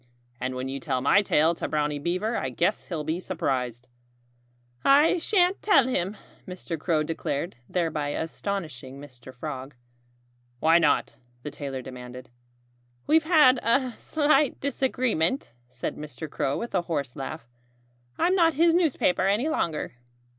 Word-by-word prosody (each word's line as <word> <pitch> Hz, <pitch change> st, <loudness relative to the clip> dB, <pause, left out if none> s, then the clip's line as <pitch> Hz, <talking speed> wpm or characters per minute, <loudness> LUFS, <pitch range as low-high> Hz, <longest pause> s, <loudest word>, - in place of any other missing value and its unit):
And 130 Hz, 0 st, -3 dB
when 130 Hz, +1 st, -3 dB
you 135 Hz, +1 st, -4 dB
tell 130 Hz, -, -1 dB
my 140 Hz, +10 st, +4 dB
tale 160 Hz, -4 st, +3 dB
to -, -, -4 dB
Brownie 150 Hz, -1 st, -1 dB
Beaver 185 Hz, +9 st, -1 dB
I 130 Hz, -, -1 dB
guess 170 Hz, -, -1 dB
he'll 165 Hz, -4 st, -3 dB
be 160 Hz, +3 st, -2 dB
surprised." 125 Hz, -9 st, -3 dB, 1.0 s
"I 295 Hz, +6 st, +5 dB
shan't 365 Hz, +1 st, +2 dB
tell 305 Hz, -, +5 dB
him," 200 Hz, -4 st, -1 dB, 0.3 s
Mr. 180 Hz, -3 st, -5 dB
Crow 155 Hz, -1 st, +1 dB
declared, 165 Hz, +1 st, -3 dB
thereby 160 Hz, -5 st, -1 dB
astonishing 155 Hz, -5 st, -4 dB
Mr. 130 Hz, -3 st, -12 dB
Frog. 135 Hz, 0 st, -7 dB, 0.8 s
"Why 165 Hz, +4 st, +5 dB
not?" 150 Hz, -4 st, +1 dB, 0.3 s
the 150 Hz, -, -5 dB
tailor 135 Hz, -3 st, -6 dB
demanded. 125 Hz, 0 st, -10 dB, 0.7 s
"We've 315 Hz, +1 st, +3 dB
had 300 Hz, -7 st, +6 dB
a 255 Hz, +2 st, +2 dB
slight 295 Hz, +2 st, +1 dB
disagreement," 255 Hz, -, 0 dB, 0.2 s
said 125 Hz, -1 st, -5 dB
Mr. 150 Hz, -1 st, -7 dB
Crow 140 Hz, -1 st, -1 dB
with 235 Hz, -, -5 dB
a 185 Hz, -, +2 dB
hoarse 145 Hz, -7 st, -3 dB
laugh. 140 Hz, -1 st, -6 dB, 0.7 s
"I'm 360 Hz, -, +2 dB
not 330 Hz, -4 st, +3 dB
his 330 Hz, +2 st, +4 dB
newspaper 290 Hz, -, +2 dB
any 215 Hz, +10 st, +1 dB
longer." 165 Hz, -, -2 dB
165 Hz, 140 wpm, -26 LUFS, -, 1.0 s, had